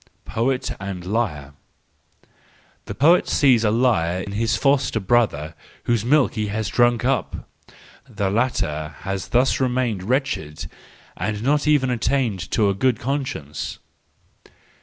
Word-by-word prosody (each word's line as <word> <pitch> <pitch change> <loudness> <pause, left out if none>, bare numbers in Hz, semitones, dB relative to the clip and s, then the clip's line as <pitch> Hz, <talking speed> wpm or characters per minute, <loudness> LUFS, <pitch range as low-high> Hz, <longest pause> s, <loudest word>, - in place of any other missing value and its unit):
Poet 125 +5 -1
and 95 -3 -6
Liar 85 -10 -2 1.3
.—The - - -6
poet 165 +8 +4
sees 125 -5 +3
in 105 - +2
the 110 - +1
liar 95 -7 +1
his 105 +3 0
foster 135 -5 +1
brother 95 -8 +1 0.3
whose 120 -3 0
milk 140 +3 +3
he 110 -2 -2
has 105 0 -2
drunk 120 +2 +2
up; 135 0 -1 0.6
the 100 -4 -2
latter 80 -10 -1
has 95 -1 -4
thus 125 +2 +2
remained 125 -6 0
wretched, 100 - -2 0.5
and 105 - -2
has 105 +3 -6
not 145 +2 +2
even 140 -4 +3
attained 115 -6 -1
to 105 - +2
a 100 - +2
good 120 +4 +1
conscience. 125 - -4
115 Hz, 135 wpm, -22 LUFS, 95-130 Hz, 1.3 s, poet